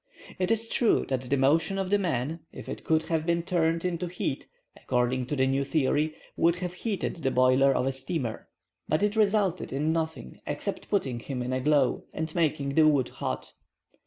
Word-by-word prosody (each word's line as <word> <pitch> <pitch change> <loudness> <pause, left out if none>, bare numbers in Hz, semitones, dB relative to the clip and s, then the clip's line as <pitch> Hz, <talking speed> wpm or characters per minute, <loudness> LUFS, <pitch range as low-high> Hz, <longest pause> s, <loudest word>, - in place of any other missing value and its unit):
It 185 0 +1
is 225 0 +1
true 230 -1 +2
that 130 -2 -2
the 140 - +2
motion 155 +8 +2
of 190 -1 -2
the 205 - +4
man, 160 -3 -1
if - - -10
it - - -6
could 160 0 +2
have 160 -2 -1
been 170 0 +1
turned 165 -1 +1
into 180 0 -1
heat, 170 -5 -3 0.3
according 125 0 0
to 150 - -2
the 130 -1 +3
new 135 +1 +1
theory, 150 +2 +1 0.2
would 170 +1 +3
have 180 -1 -4
heated 200 0 -3
the 140 -5 0
boiler 130 +1 +4
of 125 - +1
a 135 - +1
steamer. 135 -3 -4 0.4
But 155 +5 +2
it 210 +1 +1
resulted 205 -4 +2
in 150 +4 0
nothing 160 - -4
except - - -4
putting 135 - 0
him 125 0 -4
in 125 +1 -2
a 130 - 0
glow, 145 -2 +2
and 160 0 -3
making 150 -4 0
the 155 +1 +5
wood 140 -5 +3
hot. - - -5
155 Hz, 195 wpm, -28 LUFS, 135-175 Hz, 0.4 s, the